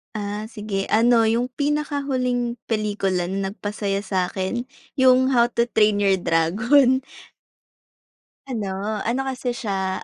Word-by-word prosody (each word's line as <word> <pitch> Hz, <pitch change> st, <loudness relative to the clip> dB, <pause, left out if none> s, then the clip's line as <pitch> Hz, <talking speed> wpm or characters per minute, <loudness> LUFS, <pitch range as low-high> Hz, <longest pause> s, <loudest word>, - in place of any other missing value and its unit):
Ah, 210 Hz, 0 st, -4 dB
sige, 210 Hz, -3 st, -4 dB
ano, 230 Hz, +1 st, +4 dB
yung 235 Hz, +3 st, +1 dB
pinakahuling 275 Hz, -4 st, -1 dB, 0.2 s
pelikula 205 Hz, -5 st, 0 dB
na 195 Hz, +2 st, -2 dB
nagpasaya 205 Hz, -1 st, -3 dB
sa'kin, 190 Hz, +3 st, -1 dB, 0.3 s
yung 260 Hz, -1 st, +4 dB
How 240 Hz, -1 st, +4 dB
to 235 Hz, -1 st, +1 dB
Train 215 Hz, -3 st, +2 dB
Your 195 Hz, -2 st, +2 dB
Dragon. 235 Hz, -, +3 dB, 1.5 s
Ano, 210 Hz, -3 st, -3 dB
ano, 250 Hz, +4 st, 0 dB
kasi, 255 Hz, -2 st, -3 dB
siya 190 Hz, -5 st, -3 dB
220 Hz, 115 wpm, -22 LUFS, 195-250 Hz, 1.5 s, ano